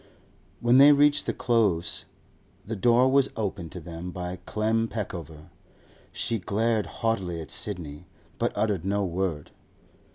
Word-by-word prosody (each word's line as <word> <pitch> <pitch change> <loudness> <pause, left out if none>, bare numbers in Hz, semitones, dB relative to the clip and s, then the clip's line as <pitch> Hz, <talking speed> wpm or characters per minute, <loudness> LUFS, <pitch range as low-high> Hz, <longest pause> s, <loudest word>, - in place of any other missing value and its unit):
When 120 +2 +5
they 145 +1 +9
reached 145 0 +3
the - - +2 0.2
Close, 105 -8 +2 0.6
the 110 +3 -4
door 120 +4 +4
was 135 0 +3
opened 95 -6 -3
to 90 - -6
them 85 +1 -7
by 90 0 -5
Clem 110 +1 0
Peckover. 85 -8 -6 0.6
She 115 - -2
glared 110 +3 0
haughtily 95 -7 -2
at 80 - -8
Sidney, 80 -8 -6 0.3
but - - +1
uttered 105 -6 0
no 100 +1 0
word. 90 -4 -3
100 Hz, 135 wpm, -26 LUFS, 90-115 Hz, 0.6 s, they